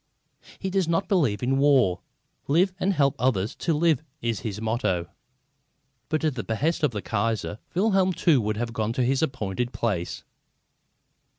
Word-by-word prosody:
He 190 - -4
does 190 -3 +1
not 165 +3 0
believe 135 - +1
in 135 +2 +1
war. 130 -11 +4 0.5
Live 180 +6 +3
and 195 - +2
help 140 -7 +2
others 115 -5 +1
to 170 - -1
live 160 -3 +2 0.2
is 115 -3 -2
his 105 -2 -5
motto. 110 -6 0 1.0
But 155 0 0
at 155 -2 +2
the 120 - -4
behest 150 +10 -1
of 150 - +3
the 105 -4 -5
Kaiser, 110 0 -1 0.2
Wilhelm 190 -1 +3
too 165 -7 +3
would 105 0 -2
have 115 0 -3
gone 110 0 -1
to 125 - 0
his 130 +2 +1
appointed 125 -5 -2
place. 95 -7 -2
130 Hz, 165 wpm, -25 LUFS, 110-160 Hz, 1.0 s, war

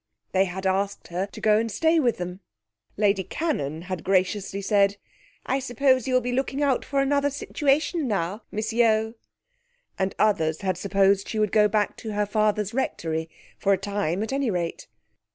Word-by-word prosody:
They 190 0 +3
had 190 +1 -6
asked 195 +1 -1
her 180 +3 -2
to - - -11
go 215 0 +4
and 225 0 -2
stay 325 +7 +3
with 245 -6 +1
them. 180 +1 -5 0.6
Lady 200 -2 +2
Cannon 170 - -3
had 185 -2 -5
graciously 195 +1 0
said, 200 0 +2 0.5
'I 265 - 0
suppose 260 0 +2
you 255 - +1
will 255 - +4
be 250 +1 -3
looking 265 +3 -1
out 270 -3 +2
for 275 -1 0
another 285 +1 +2
situation 290 +2 0
now, 200 0 -2
Miss 215 +2 -3
Yeo?' 220 -1 +3 0.9
and 190 0 -1
others 160 -7 +1
had 190 -2 0
supposed 195 +1 +2
she 220 - -3
would 215 -2 +1
go 210 -1 +5
back 210 0 0
to 220 -2 -6
her 210 0 +1
father's 210 0 0
Rectory, 160 -10 -2 0.3
for 200 - +3
a - - +2
time, 200 -1 -2
at 225 - -4
any 275 -3 0
rate. 175 -4 -3
210 Hz, 180 wpm, -25 LUFS, 190-245 Hz, 0.9 s, go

